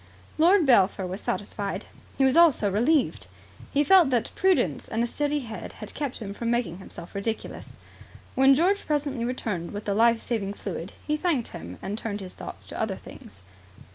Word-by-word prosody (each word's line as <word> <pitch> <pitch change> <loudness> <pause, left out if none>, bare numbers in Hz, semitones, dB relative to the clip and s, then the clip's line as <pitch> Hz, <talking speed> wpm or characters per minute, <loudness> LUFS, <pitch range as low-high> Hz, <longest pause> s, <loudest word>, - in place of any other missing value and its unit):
Lord 350 +2 +5
Belpher 200 -6 +4
was 185 +3 -5
satisfied. 200 -1 -3 0.3
He 270 - +4
was 265 - +3
also 310 -12 +5
relieved. 255 +8 +1 0.4
He 290 - +3
felt 365 -2 +6
that 245 -4 0
prudence 380 -1 +1
and 225 +1 -1
a - - +2
steady 290 +4 -1
head 225 -3 -7
had - - -9
kept 285 -4 -3
him 200 -3 -6
from 230 +3 -3
making 235 -7 -1
himself 175 -2 -9
ridiculous. 220 +3 -5 0.6
When 270 +1 +6
George 375 +7 +2
presently 285 -5 -1
returned 210 -8 -3
with 205 +1 -6
the 200 - 0
life 230 +2 +4
saving 205 -5 -2
fluid, 180 -2 -6
he 300 0 0
thanked 300 -8 0
him 85 +3 -8
and 205 +3 -3
turned 210 -3 -4
his 185 -1 -8
thoughts - - -9
to - - -6
other - - -1
things. 95 -1 -13
235 Hz, 180 wpm, -26 LUFS, 200-290 Hz, 0.6 s, felt